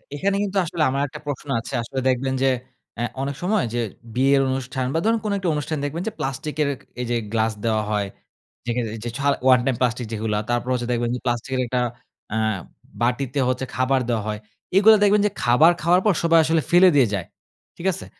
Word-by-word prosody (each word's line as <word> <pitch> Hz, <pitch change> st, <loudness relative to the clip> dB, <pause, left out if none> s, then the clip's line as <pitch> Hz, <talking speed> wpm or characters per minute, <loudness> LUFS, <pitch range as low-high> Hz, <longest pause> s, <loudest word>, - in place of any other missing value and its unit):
এখানে 195 Hz, +6 st, 0 dB
কিন্তু 200 Hz, -1 st, -2 dB
আসলে 160 Hz, 0 st, -1 dB
আমার 135 Hz, +1 st, -1 dB
একটা 150 Hz, +1 st, -9 dB
প্রশ্ন 145 Hz, 0 st, -5 dB
আছে। 115 Hz, -, -8 dB
আসলে 130 Hz, +3 st, -4 dB
দেখবেন 130 Hz, +1 st, 0 dB
যে 135 Hz, -, +4 dB, 0.5 s
অ্যা 120 Hz, -, -1 dB, 0.2 s
অনেক 140 Hz, 0 st, -2 dB
সময় 205 Hz, +2 st, +2 dB
যে 120 Hz, -, 0 dB, 0.3 s
বিয়ের 135 Hz, +2 st, +4 dB
অনুষ্ঠান 130 Hz, 0 st, -2 dB
বা 165 Hz, -, +1 dB
ধরুন 225 Hz, 0 st, +3 dB
কোনো 205 Hz, -, 0 dB
একটা 185 Hz, -3 st, -1 dB
অনুষ্ঠান 150 Hz, +1 st, -2 dB
দেখবেন 155 Hz, +4 st, -3 dB
যে -, -, -1 dB
প্লাস্টিকের 145 Hz, +3 st, -2 dB
ক -, -, -22 dB, 0.2 s
এই -, -, -2 dB
যে -, -, +2 dB, 0.2 s
গ্লাস 110 Hz, 0 st, +2 dB
দেওয়া 110 Hz, -1 st, +1 dB
হয়। 100 Hz, -1 st, 0 dB, 0.6 s
যেখানে 120 Hz, -1 st, -1 dB
এই -, -, -7 dB
যে -, -, -2 dB
ছাড় 140 Hz, 0 st, +2 dB
ওয়ান 130 Hz, -1 st, +7 dB
টাইম 130 Hz, -3 st, +1 dB
প্লাস্টিক 120 Hz, -1 st, 0 dB
যেগুলা 105 Hz, -1 st, -1 dB
তারপর 120 Hz, +1 st, -1 dB
হচ্ছে 120 Hz, -1 st, -2 dB
দেখবেন 120 Hz, 0 st, 0 dB
যে -, -, -4 dB
প্লাস্টিকের 130 Hz, +2 st, -1 dB
একটা 125 Hz, +1 st, 0 dB, 0.5 s
আ -, -, 0 dB, 0.6 s
বাটিতে 125 Hz, +3 st, 0 dB
হচ্ছে 130 Hz, +1 st, -1 dB
খাবার 130 Hz, +1 st, +2 dB
দেওয়া 110 Hz, -3 st, 0 dB
হয়। 105 Hz, 0 st, -3 dB, 0.4 s
এগুলা 215 Hz, +2 st, +8 dB
দেখবেন 205 Hz, 0 st, +4 dB
যে 205 Hz, -, +1 dB
খাবার 135 Hz, +8 st, +6 dB
খাওয়ার 175 Hz, +3 st, +4 dB
পর 205 Hz, -, +5 dB
সবাই 165 Hz, 0 st, +5 dB
আসলে 160 Hz, 0 st, +2 dB
ফেলে 180 Hz, +2 st, +7 dB
দিয়ে 130 Hz, -5 st, +5 dB
যায়। 95 Hz, -4 st, -2 dB, 0.5 s
ঠিক 180 Hz, -, -3 dB
আছে? 190 Hz, -, -7 dB
135 Hz, 210 wpm, -23 LUFS, 120-160 Hz, 0.6 s, এগুলা